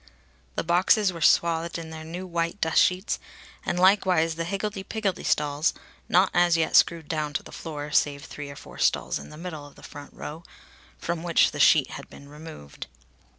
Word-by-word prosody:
The - - -1
boxes 185 +3 +3
were 165 - -8
swathed 170 +1 +2
in 165 -1 -8
their 160 0 -8
new 175 +4 -6
white 170 +1 -2
dust 160 -3 +3
sheets; 185 +3 +1 0.4
and 175 - -2
likewise 185 -4 +4
the 165 +1 -4
higgledy 195 +2 -3
piggledy 195 -2 -3
stalls, 150 +2 +1 0.3
not 185 +3 +4
as 175 -1 +4
yet 160 -1 0
screwed 165 -3 +4
down 150 -2 -2
to - - -2
the - - -12
floor, 150 -2 -6
save 145 -1 +1
three 145 -1 -8
or 140 - -9
four - - -12
stalls - - +1
in - - -11
the 150 - -11
middle 160 -4 -7
of 145 - -18
the - - -17
front 145 -1 -10
row, 155 +3 -8 0.6
from 170 -1 -3
which 170 -1 +3
the - - -7
sheet - - +5
had - - -9
been 140 - -13
removed. 150 - -10
165 Hz, 195 wpm, -26 LUFS, 150-180 Hz, 0.6 s, sheet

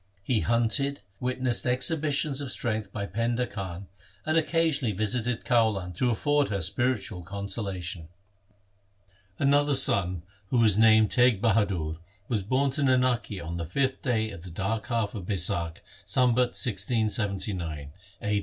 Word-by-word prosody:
He 115 +2 +1
hunted, 120 +5 +1 0.2
witnessed 125 -1 0
exhibitions 145 +2 +2
of 135 -2 -3
strength 110 -5 -2
by 100 -1 -4
Painda 115 +4 -1
Khan, 95 -4 -6 0.4
and 155 - 0
occasionally 160 - +1
visited 110 +3 -1
Kaulan 110 -7 +1
to 125 +8 0
afford 145 +5 +1
her 100 -4 -2
spiritual 100 0 -1
consolation. 95 -2 -4 1.3
Another 145 +1 +3
son, 95 -9 +1 0.2
who 125 - 0
was 110 -4 +4
named 110 -1 +5
Teg 125 -4 +4
Bahadur, 100 -8 +1 0.3
was 110 -5 0
born 130 +7 +1
to 145 +3 -4
Nanaki 125 -6 +1
on 85 +1 -5
the 85 - -3
fifth 130 +8 -1
day 110 -4 0
of 85 - -9
the 90 - -9
dark 105 +6 -3
half 115 -4 -1
of 100 -6 -7
Baisakh, 85 -4 -1 0.2
Sambat 125 -1 +2
1679 100 - -2 0.3
(a. 105 0 +1
110 Hz, 135 wpm, -27 LUFS, 95-125 Hz, 1.3 s, named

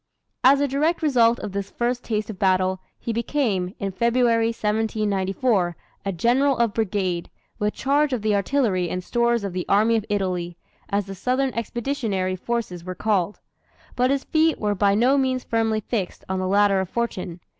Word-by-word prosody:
As 275 +2 +6
a 285 - +2
direct 305 +5 0
result 240 -5 +4
of 210 - -5
this 200 0 -4
first 245 +2 -2
taste 215 -1 -2
of 190 - -11
battle, 185 -1 +2 0.2
he 230 - -4
became, 220 -6 -1
in 195 -1 -3
February, 235 +2 +2
1794, 210 -3 0 0.3
a 195 - -1
General 250 +9 +2
of 235 -3 +1
Brigade, 190 -5 -1 0.3
with 210 0 0
charge 285 +2 +1
of 245 -5 -2
the 215 -1 +2
artillery 200 -4 +1
and 180 +1 -3
stores 235 +1 +1
of 195 -3 -4
the 180 -1 -2
"Army 220 +3 +4
of 220 -2 0
Italy," 180 -4 -2 0.3
as 200 0 0
the 195 - -7
southern 255 +6 0
expeditionary 225 -5 -2
forces 185 -4 -3
were 185 +1 -6
called. 205 -2 0 0.5
But 250 +1 +2
his 275 0 +1
feet 320 0 +2
were 210 -1 0
by 200 0 +2
no 255 +6 +4
means 260 -1 0
firmly 225 -1 0
fixed 200 -4 -4
on 190 0 -2
the 185 - -1
ladder 200 0 +3
of 190 -2 -2
fortune. 190 -7 -3
215 Hz, 175 wpm, -23 LUFS, 190-240 Hz, 0.5 s, As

